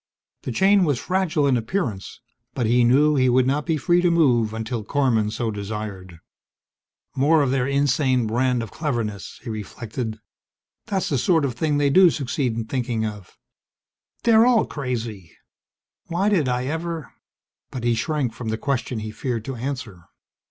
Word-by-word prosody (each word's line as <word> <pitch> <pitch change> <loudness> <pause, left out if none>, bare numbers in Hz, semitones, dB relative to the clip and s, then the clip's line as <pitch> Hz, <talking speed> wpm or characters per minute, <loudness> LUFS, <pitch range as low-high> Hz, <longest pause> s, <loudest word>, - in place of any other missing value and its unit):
The - - -5
chain 195 - +4
was 145 -6 +1
fragile 180 -2 0
in 135 -2 +3
appearance, 115 - -3 0.3
but 125 - 0
he 120 +2 +3
knew 140 +6 +4
he 130 -2 +3
would 125 +1 +3
not 140 +5 0
be 160 -2 +1
free 175 +5 +2
to 175 - +3
move 125 -10 +3
until 110 +1 -4
Korman 115 -3 +1
so 115 0 -2
desired. 100 -4 -6 1.0
More 150 +3 +4
of 130 - 0
their 130 -1 +1
insane 140 -3 +2
brand 120 +2 0
of 110 - -9
cleverness! 115 - -4
he 120 - -5
reflected. 110 +1 -5 0.7
That's 195 -2 -1
the 140 - +1
sort 160 +2 +2
of 130 - -2
thing 145 +4 0
they 145 -1 +2
do 185 +3 +7
succeed 135 -4 -2
in 115 -1 -3
thinking 120 -2 -2
of. 105 -3 -8 0.9
They're 230 0 +5
all 240 -3 +4
crazy! 115 - -5 0.7
Why 185 +5 +1
did 165 -11 +2
I 125 +1 -1
ever... 160 0 -4 0.6
But 125 - -6
he 120 0 +2
shrank 140 -1 -1
from 115 -1 -6
the 110 - -1
question 125 -3 -2
he 110 0 -5
feared 115 -1 -4
to 135 - -4
answer. 120 -7 -5
130 Hz, 165 wpm, -23 LUFS, 115-150 Hz, 1.0 s, do